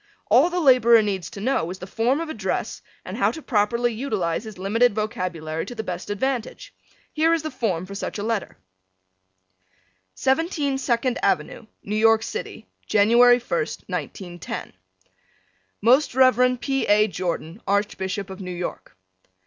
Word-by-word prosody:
All 260 +10 +6
the 360 0 -1
laborer 240 -6 +6
needs 190 -5 -3
to 230 - -9
know 215 -6 0
is 185 - -6
the 185 - -8
form 235 +8 0
of 330 - -4
address 215 -11 -3 0.2
and - - -6
how - - +3
to 325 - -6
properly 235 -2 0
utilize 215 -7 -2
his 215 -3 -9
limited 210 +4 +2
vocabulary 175 -7 -3
to 245 - -7
the 220 - -4
best 180 -2 -6
advantage. 245 +3 -3 0.4
Here 325 +2 +3
is 325 - -4
the 310 - -4
form 190 -9 -2
for 200 - -9
such 200 - -5
a 205 - -4
letter: 225 -2 -2 1.6
17 285 -1 0
Second 245 -1 0
Avenue, 195 +4 -1 0.2
New 210 - -3
York 225 0 +4
City. 450 - -6 0.2
January 240 +4 +5
1st, 445 - -3
1910. 175 -3 -6 1.1
Most 255 +4 +4
Rev. 250 -1 +4
P. 270 0 -1
A. 210 +1 +4
Jordan, 180 0 -4
Archbishop 195 -1 -1
of 190 - -8
New 180 - -6
York. 175 - -6
220 Hz, 150 wpm, -23 LUFS, 195-255 Hz, 1.6 s, All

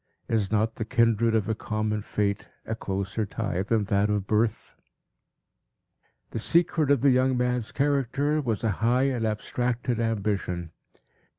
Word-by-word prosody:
Is 110 -3 0
not 110 +1 +1
the - - -2
kindred 115 -1 +2
of 110 -3 +1
a 110 - +1
common 110 -1 -2
fate 100 -1 -2 0.2
a 110 - -3
closer 100 0 -3
tie 100 -3 -2
than 110 +2 +1
that 100 +1 +1
of 105 -2 0
birth? 110 +1 0 1.6
The - - -3
secret 165 +2 +2
of 140 -4 +4
the 140 0 +5
young 130 0 +3
man's 125 -2 -1
character 145 +1 +1
was, 115 -5 -2
a 110 - +2
high 120 +3 +3
and 120 -3 -1
abstracted 120 +2 -2
ambition. 100 -6 -1
110 Hz, 150 wpm, -26 LUFS, 105-125 Hz, 1.6 s, the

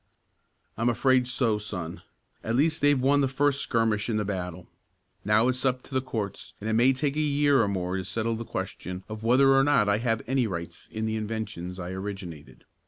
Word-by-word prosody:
"I'm 120 +2 +2
afraid 125 +1 +3
so, 115 -4 +1
son. 90 -6 -6 0.4
At 115 - -1
least 155 +4 +2
they've 145 -1 +4
won 140 +3 +3
the 135 - +3
first 140 +1 +1
skirmish 115 -1 0
in 110 - +1
the 105 - -1
battle. 90 -4 -4 0.6
Now 105 +3 +3
it's 130 0 -1
up 130 -1 0
to - - -13
the 130 - +2
courts, 110 -6 -5
and 105 - -6
it 110 - 0
may 120 +4 +5
take 140 +2 -1
a - - -1
year 145 -3 +3
or 105 - +2
more 95 -1 -2
to 95 - -3
settle 115 +5 -2
the 115 - -5
question 90 -4 -5
of 110 0 -7
whether 135 +4 +5
or 135 0 +5
not 140 -7 +3
I 100 +1 +2
have 115 -2 0
any 130 -1 +1
rights 85 -4 -6
in 110 0 -3
the 110 0 -1
inventions 105 -5 -4
I 90 -1 -5
originated. 95 -5 -7
115 Hz, 210 wpm, -27 LUFS, 100-130 Hz, 0.6 s, may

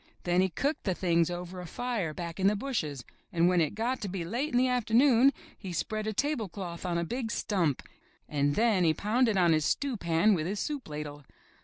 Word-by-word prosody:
Then 175 +1 +2
he 190 - +2
cooked 280 - -2
the 190 -3 0
things 170 -2 +2
over 180 +1 -6
a 180 - -8
fire 230 -5 -2
back 170 +2 -6
in 190 - +3
the 210 - +3
bushes, 160 - -3 0.3
and 170 0 +3
when 180 -1 +3
it 160 +4 0
got 240 +4 -1
to 205 - -3
be 180 -2 -4
late 245 - -2
in 245 - +2
the 255 +1 +4
afternoon 250 +2 +4 0.2
he 190 -3 -8
spread 215 +5 -2
a - - 0
tablecloth 205 - -3
on 170 -1 0
a 170 - 0
big 235 +6 -3
stump 180 - 0 0.4
and 145 -1 0
then 220 -5 +3
he 160 -2 +3
pounded 220 0 +1
on 175 -3 +4
his 155 -1 +2
stew 270 - 0
pan 170 +3 +3
with 165 -3 -1
his 200 +2 -3
soup 290 - -4
ladle. 150 -1 -6
190 Hz, 215 wpm, -29 LUFS, 170-235 Hz, 0.4 s, the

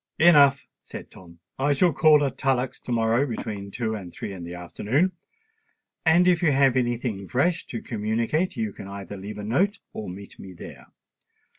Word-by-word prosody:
"Enough," 145 -5 +6
said - - -10
Tom. 85 -2 -15 0.2
"I 145 +2 +2
shall 170 +4 +3
call 150 0 +5
at 135 - -3
Tullock's 130 -1 0
to - - -7
morrow 115 +4 +2
between 105 -4 -5
two 110 +1 -2
and 95 -5 -7
three 100 - -6
in 90 -3 -8
the 85 +1 -7
afternoon; 110 - 0 1.0
and 175 +3 +5
if 175 -2 +3
you 165 -4 +3
have 135 -2 +4
any 120 -2 +1
thing 105 -6 -4
fresh 160 - 0
to 115 - -6
communicate, 115 - -1
you 110 -3 -2
can 95 - -9
either 100 0 -7
leave 100 +2 -7
a 105 - -6
note 180 - +1 0.2
or 105 - -6
meet 100 +2 -10
me 95 -1 -10
there. 85 - -11
120 Hz, 185 wpm, -25 LUFS, 100-140 Hz, 1.0 s, Enough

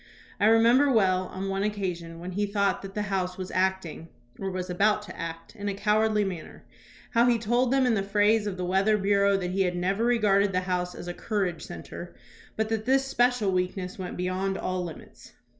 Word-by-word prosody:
I 205 - +4
remember 235 +5 +5
well, 185 -5 +2
on 190 +2 -5
one 195 0 -1
occasion 180 -5 -3
when 180 +2 -6
he 205 +3 -1
thought 200 -1 0
that 195 0 -9
the 210 - -1
House 185 -3 -2
was 185 0 -6
acting 185 -3 -1 0.3
or 195 - -2
was 185 -1 -4
about 210 +4 +2
to - - -10
act 165 0 -7
in 205 0 -3
a 200 - -3
cowardly 210 +1 +2
manner, 180 -5 -6 0.5
how 235 +1 +4
he 240 -1 +4
told 240 +3 +1
them 270 -1 +3
in 245 - +3
the 205 - +1
phrase 205 +2 +2
of 190 -2 -4
the 180 - -2
weather 195 +4 +2
bureau 200 0 +3
that 180 -2 -3
he 195 +1 0
had 180 -2 +1
never 190 +5 0
regarded 205 -4 +3
the 185 - +1
House 180 -1 -2
as 175 - -8
a 175 - -3
"courage 185 -5 -2
centre," 175 0 -9 0.4
but 220 0 -1
that 220 -1 -2
this 270 +1 +3
special 245 -5 +2
weakness 185 +1 -2
went 180 -1 -5
beyond 185 +2 -1
all 185 -1 -2
limits. 165 -3 -11
195 Hz, 210 wpm, -27 LUFS, 185-215 Hz, 0.5 s, remember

